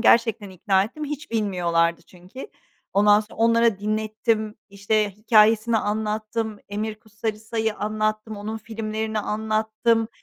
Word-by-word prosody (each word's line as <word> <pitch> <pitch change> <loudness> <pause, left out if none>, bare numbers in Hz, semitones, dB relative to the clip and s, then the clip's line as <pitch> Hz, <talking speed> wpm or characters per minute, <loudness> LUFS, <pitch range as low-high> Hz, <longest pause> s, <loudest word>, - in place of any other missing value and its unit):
Gerçekten 225 -3 +3
ikna 190 +1 +2
ettim, 300 +8 -6
hiç 295 0 -6
bilmiyorlardı 170 -6 +1
çünkü. 185 - -11 0.4
Ondan 205 +1 +5
sonra 210 - -12
onlara 230 -2 +3
dinlettim, 215 +1 -1
işte, 205 +1 0
hikâyesini 215 +2 +4
anlattım, 215 +1 -2
Emir 215 +2 -3
Kusturica’yı 220 0 -3
anlattım, 215 0 -2
onun 215 +2 -5
filmlerini 220 0 -3
anlattım. 220 +2 0
215 Hz, 110 wpm, -24 LUFS, 210-225 Hz, 0.4 s, Ondan